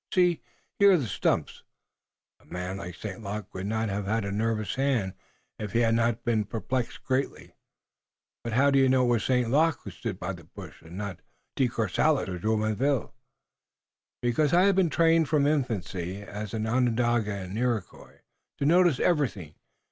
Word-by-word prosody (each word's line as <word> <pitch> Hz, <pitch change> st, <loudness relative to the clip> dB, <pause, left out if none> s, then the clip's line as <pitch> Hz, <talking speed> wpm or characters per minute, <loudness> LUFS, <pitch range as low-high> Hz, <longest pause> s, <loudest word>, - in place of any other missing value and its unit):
See, 180 Hz, -5 st, +3 dB, 0.4 s
here 200 Hz, -1 st, +7 dB
are -, -, +5 dB
the 140 Hz, -, -2 dB
stumps. 105 Hz, -, -1 dB, 0.8 s
A -, -, -25 dB
man 90 Hz, +2 st, -5 dB
like 90 Hz, -3 st, -7 dB
St. 100 Hz, 0 st, -7 dB
Luc 105 Hz, 0 st, -6 dB
would 95 Hz, +1 st, -4 dB
not 110 Hz, +1 st, -1 dB
have 100 Hz, 0 st, -3 dB
had 110 Hz, 0 st, 0 dB
a 100 Hz, -, -3 dB
nervous 110 Hz, 0 st, -1 dB
hand 130 Hz, -9 st, 0 dB, 0.5 s
if 105 Hz, -1 st, -5 dB
he 120 Hz, -, +3 dB
had 115 Hz, -1 st, +3 dB
not 115 Hz, 0 st, +1 dB
been 110 Hz, -2 st, +1 dB
perplexed 115 Hz, +4 st, -3 dB
greatly." 130 Hz, 0 st, -2 dB, 0.9 s
"But 115 Hz, -, -4 dB
how 140 Hz, +4 st, +4 dB
do 135 Hz, -, +4 dB
you 135 Hz, -1 st, +4 dB
know 130 Hz, 0 st, +4 dB
it -, -, +1 dB
was 120 Hz, -2 st, +2 dB
St. 125 Hz, -3 st, +1 dB
Luc 160 Hz, +3 st, +3 dB
who -, -, -7 dB
stood 105 Hz, -5 st, -5 dB
by 95 Hz, +2 st, -3 dB
the 85 Hz, -2 st, -12 dB
bush, -, -, -12 dB
and 85 Hz, +2 st, -11 dB
not 100 Hz, -4 st, -5 dB, 0.4 s
De 130 Hz, -, +2 dB
Courcelles 135 Hz, +5 st, +1 dB
or 90 Hz, -1 st, -4 dB
Jumonville?" 110 Hz, +6 st, 0 dB, 1.1 s
"Because 135 Hz, +6 st, +2 dB
I 180 Hz, -, +6 dB
have 200 Hz, -1 st, +4 dB
been 185 Hz, -3 st, +3 dB
trained 165 Hz, -1 st, +3 dB
from 150 Hz, -2 st, +3 dB
infancy, 100 Hz, -, -2 dB
as 105 Hz, +1 st, -6 dB
an 110 Hz, 0 st, -2 dB
Onondaga 120 Hz, -2 st, +1 dB
and 95 Hz, 0 st, -6 dB
Iroquois, 115 Hz, -5 st, -3 dB, 0.4 s
to 140 Hz, -, -1 dB
notice 170 Hz, -2 st, +4 dB
everything. 120 Hz, -, 0 dB
115 Hz, 180 wpm, -27 LUFS, 100-135 Hz, 1.1 s, here